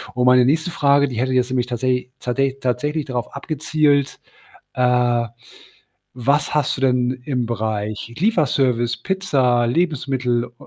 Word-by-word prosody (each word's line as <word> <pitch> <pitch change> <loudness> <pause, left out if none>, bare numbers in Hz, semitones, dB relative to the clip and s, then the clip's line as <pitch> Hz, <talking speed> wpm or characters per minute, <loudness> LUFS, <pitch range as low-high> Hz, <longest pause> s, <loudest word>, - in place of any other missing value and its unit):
Und 125 0 +1
meine 125 -1 +6
nächste 155 +5 +1
Frage, 140 -2 +3
die 125 -3 -6
hätte 130 +1 0
jetzt 125 0 +1
nämlich 125 -2 0
tatsä 125 +1 -1
tsatä 135 +2 -1
tatsächlich 145 +5 -1
darauf 125 -3 -4
abgezielt, 145 -1 0 0.5
äh, 125 -1 +2 0.9
was 140 +5 +1
hast 150 -3 +1
du - - -5
denn 125 -1 +2
im 125 -4 -1
Bereich 110 0 -4
Lieferservice, 135 - +1
Pizza, 130 -11 +1
Lebensmittel, 130 -5 0
ö - - -15
130 Hz, 135 wpm, -20 LUFS, 120-145 Hz, 0.9 s, meine